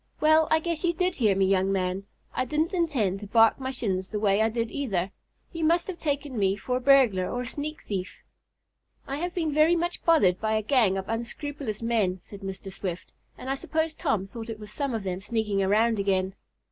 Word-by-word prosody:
"Well, 315 0 +5
I 315 - +5
guess 330 +1 -3
you 345 -1 +2
did 365 +1 0
hear 215 - +2
me, 195 0 +3
young 190 0 +2
man. 190 +1 -1 0.3
I - - 0
didn't 305 +7 -1
intend 265 - 0
to 205 - -8
bark 225 +3 +5
my 260 -1 -3
shins 195 -8 -2
the 210 - -3
way 205 0 +3
I 220 - +3
did, 230 0 -2
either. 195 -10 -2 0.4
You 330 -1 -3
must 335 +2 +3
have 370 -3 -6
taken 285 -5 -2
me 195 -1 +2
for 250 +5 -2
a - - -5
burglar 250 -9 +4
or 245 - -2
a - - -4
sneak 300 +4 -5
thief." 185 -2 -5 0.8
"I 275 - -4
have 350 +3 -3
been 320 -4 0
very 310 +3 +5
much 345 +1 -2
bothered 200 - +4
by 220 0 0
a 215 0 +1
gang 220 -5 +3
of 190 0 -4
unscrupulous 235 0 -4
men," 215 -6 +1
said 200 - -11
Mr. 195 0 -6
Swift, 185 -2 -5 0.3
"and - - -9
I 270 - +1
suppose 315 +3 -1
Tom 200 -9 -1
thought 225 +3 -8
it 220 -1 -5
was 210 -1 -9
some 275 0 -2
of 220 - -3
them 185 -1 -3
sneaking 210 -1 -1
around 215 +3 +2
again." 190 -1 +1
225 Hz, 220 wpm, -27 LUFS, 195-290 Hz, 0.8 s, Well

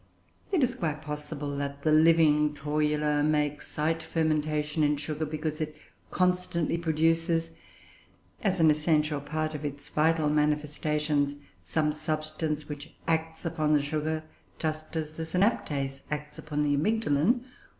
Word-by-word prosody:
It 355 -8 +3
is 250 -1 +2
quite 155 -7 -3
possible 150 -1 -4
that 140 0 -4
the 155 - +3
living 155 -1 +5
Torula 150 0 +1
may 150 0 +3
excite 155 +2 -2
fermentation 155 -1 0
in 150 0 +3
sugar, 155 +1 -3
because 155 +1 -3
it 155 0 -3 0.3
constantly 180 -3 +1
produces, 165 +1 +1 0.9
as 190 -2 +1
an 160 -1 +6
essential 150 -1 +2
part 155 +2 -2
of 150 0 -5
its 145 0 -5
vital 155 0 +2
manifestations, 150 -1 +1 0.3
some 155 -1 0
substance 155 0 -3
which 145 -1 -8
acts 160 0 -1
upon 155 -2 +1
the 150 - +4
sugar, 155 +1 -2 0.3
just 155 0 -3
as 155 -1 -3
the 160 - -4
synaptase 150 - 0
acts 150 0 -5
upon 150 -1 -2
the 145 -1 +2
amygdalin. 210 - +2
155 Hz, 135 wpm, -28 LUFS, 150-160 Hz, 0.9 s, an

